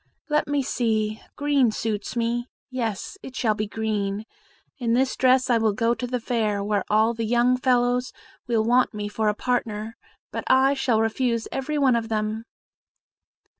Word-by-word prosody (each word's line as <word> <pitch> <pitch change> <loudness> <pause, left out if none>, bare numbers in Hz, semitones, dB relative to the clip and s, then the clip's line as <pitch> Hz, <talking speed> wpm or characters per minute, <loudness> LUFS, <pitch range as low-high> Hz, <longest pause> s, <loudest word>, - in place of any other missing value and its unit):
Let 300 0 +1
me 285 -1 0
see 220 -3 -1
green 285 -4 +3
suits 215 -1 -3
me; 240 +1 -1 0.2
yes, 235 - -3
it 260 - -10
shall 220 -4 +2
be 215 0 -3
green. 210 -1 -2 0.5
In 235 -2 +1
this 260 +1 +1
dress 255 0 +4
I 240 -2 +3
will 220 -2 +2
go 230 +3 +1
to 245 +1 -4
the 250 0 -2
fair, 220 -4 -1
where 205 -1 0
all 220 +2 +3
the 230 0 -3
young 240 +2 +3
fellows 250 0 +1 0.4
will 230 -2 +2
want 245 0 +2
me 205 0 -3
for 215 +1 -1
a 210 - -1
partner, 225 -2 -2 0.4
but - - -4
I 265 +1 +5
shall 255 -5 +1
refuse 230 +1 0
every 280 +3 -2
one 265 -4 +4
of 230 -1 -2
them." 215 +1 -2
230 Hz, 170 wpm, -24 LUFS, 215-255 Hz, 0.5 s, I